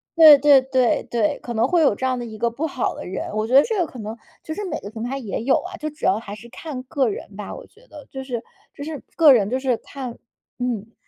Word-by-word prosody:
对 315 -3 +10
对 280 -1 +6
对 260 -2 +1
对， 285 +5 0
可 240 - -6
能 230 +2 +2
会 345 +3 +3
有 280 -9 +4
这 260 - -3
样 255 -1 0
的 240 - -5
一 220 -2 -9
个 235 +1 +1
不 290 +7 -2
好 265 -4 -2
的 - - -8
人， 185 +1 -5
我 215 +1 -1
觉 250 - -3
得 275 - +10
这 445 -2 -2
个 345 - +1
可 250 - -11
能 215 +2 -6 0.3
就 315 - -5
是 415 - -5
每 370 - -3
个 200 - -8
平 220 0 -6
台 260 +3 -3
也 225 -7 -4
有 265 +2 +3
啊， 365 +1 -8
就 305 - -4
主 300 0 -7
要 195 +3 +3
还 210 -2 -8
是 235 +3 -13
看 270 -2 -7
个 260 -2 0
人 200 0 -7
吧， 210 -1 -7
我 - - -10
觉 465 +4 -24
得 295 - -13
就 265 0 -6
是 245 -3 -4 0.3
就 285 - -8
是 300 -2 -6
个 310 -4 +8
人 210 -4 +2
就 255 +1 -1
是 260 -3 0
看 255 -2 -8 0.4
嗯。 230 -3 -3
255 Hz, 300 characters per minute, -22 LUFS, 230-295 Hz, 0.4 s, 对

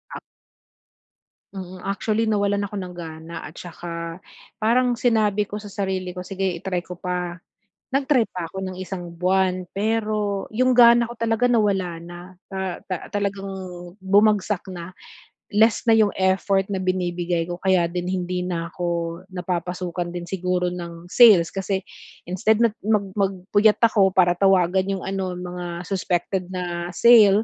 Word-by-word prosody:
Ah - - -5 1.4
Mm, 185 -1 -7
actually 215 +4 -1
nawalan 205 -1 +1
ako 210 - -9
ng 185 -2 -5
gana 165 -1 -8
at 155 - -14
'saka 170 0 -7 0.4
parang 240 +2 +2
sinabi 210 -4 +2
ko 205 - -7
sa 210 -1 -7
sarili 190 -2 -2
ko, 180 - -8
"Sige 190 +1 -5 0.2
i-try 180 -1 -2
ko 180 -1 -9
pa." 180 -1 -3 0.5
Nag-try 270 -3 +2
pa 180 -2 -4
'ko 190 +3 -7
ng 185 -1 -5
1 180 -2 -6
buwan 185 0 +1
pero 210 -1 -1
'yong 255 +3 +3
gana 235 -1 +7
ko - - -7
talaga 230 +2 +1
nawala 195 -7 +1
na, 175 +1 -10 0.3
ta 190 -2 -4
ta 185 -2 -5
talagang 200 -1 -2 0.5
bumagsak 205 0 +2
na. 175 0 -8 0.6
Less 220 +3 +3
na 230 - +5
'yong 220 -2 +5
effort 195 +1 +2
na 190 -2 -1
binibigay 175 -2 -1
ko 175 0 -6
kaya 185 -3 +3
din 175 +1 -3
hindi 180 -1 -2
na 170 -2 -3
ako 170 -1 -2
napapasukan 180 -1 -3
din 175 0 -6
siguro 180 0 -1
ng 170 -1 -8
sales, 205 -9 +7
kasi 195 0 -2 0.4
instead 210 +5 +1
nag 230 -1 +3
mag 210 -1 +1
mag-puyat 200 +2 +2
ako 200 -4 +4
para 175 -2 +5
tawagan 190 0 +3
'yong - - -8
ano, 190 -2 -3
mga 180 -1 -6
suspected 185 -1 -1
na 175 -2 -4
sale, 215 -3 +7
190 Hz, 150 wpm, -23 LUFS, 175-205 Hz, 1.4 s, gana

